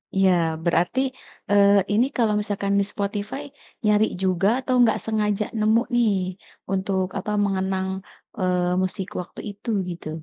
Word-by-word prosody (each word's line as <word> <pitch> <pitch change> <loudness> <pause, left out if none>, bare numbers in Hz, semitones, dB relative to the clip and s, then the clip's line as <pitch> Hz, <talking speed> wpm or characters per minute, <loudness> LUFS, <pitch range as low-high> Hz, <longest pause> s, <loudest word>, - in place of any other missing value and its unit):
Iya 195 -1 +4 0.3
berarti, 175 +8 +2 0.5
eee, 200 0 +6 0.2
ini 225 +4 +4
kalau 225 -3 +3
misalkan 200 -1 -2
di 200 - +2
Spotify, 205 +6 -3 0.4
nyari 210 0 +4 0.2
juga 185 0 +2
atau 260 0 -2
enggak 235 -3 +5
sengaja 210 -1 0
nemu 220 +2 +4
nih, 235 -2 +4 0.6
untuk 190 -1 0
apa 210 - -4
mengenang, 190 -1 -1 0.5
eee, 180 0 +1
musik 185 0 -2
waktu 180 - -12
itu 205 +4 -9 0.2
gitu? 170 -2 -6
200 Hz, 135 wpm, -24 LUFS, 190-215 Hz, 0.6 s, eee